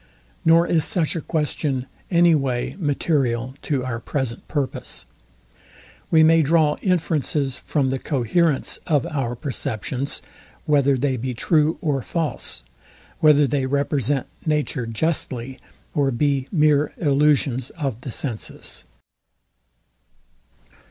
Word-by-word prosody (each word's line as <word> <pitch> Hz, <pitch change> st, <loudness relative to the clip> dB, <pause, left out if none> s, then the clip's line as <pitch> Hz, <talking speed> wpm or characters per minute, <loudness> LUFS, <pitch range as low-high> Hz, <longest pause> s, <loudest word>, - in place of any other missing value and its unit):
Nor 165 Hz, +1 st, +5 dB
is 165 Hz, -3 st, +2 dB
such 175 Hz, -6 st, +1 dB
a 165 Hz, -, -2 dB
question 150 Hz, -5 st, -1 dB, 0.2 s
any 170 Hz, -1 st, +5 dB
way 130 Hz, -5 st, -1 dB
material 135 Hz, -6 st, 0 dB
to 135 Hz, -4 st, -1 dB
our 120 Hz, -2 st, -3 dB
present 130 Hz, -1 st, -4 dB
purpose. 145 Hz, -4 st, -3 dB, 1.0 s
We 160 Hz, -1 st, +6 dB
may 165 Hz, +1 st, +6 dB
draw 155 Hz, 0 st, +3 dB
inferences 155 Hz, -7 st, 0 dB
from 135 Hz, -4 st, 0 dB
the 135 Hz, -, -1 dB
coherence 145 Hz, +3 st, 0 dB
of 150 Hz, -6 st, +2 dB
our 135 Hz, -6 st, -2 dB
perceptions, 130 Hz, +1 st, -3 dB, 0.4 s
whether 140 Hz, -2 st, +3 dB
they 130 Hz, 0 st, 0 dB
be 125 Hz, +1 st, -3 dB
true 155 Hz, +4 st, +2 dB
or 145 Hz, -4 st, 0 dB
false; 160 Hz, -, -3 dB, 0.6 s
whether 150 Hz, -2 st, +6 dB
they 135 Hz, 0 st, 0 dB
represent 140 Hz, -1 st, +1 dB, 0.2 s
nature 150 Hz, -6 st, -1 dB
justly, 130 Hz, 0 st, -2 dB, 0.3 s
or 140 Hz, -2 st, +2 dB
be 135 Hz, +1 st, 0 dB
mere 150 Hz, -3 st, +3 dB
illusions 140 Hz, -4 st, +2 dB
of 135 Hz, -8 st, -4 dB
the 125 Hz, -, -6 dB
senses. 115 Hz, -3 st, -4 dB
145 Hz, 115 wpm, -22 LUFS, 130-155 Hz, 1.0 s, We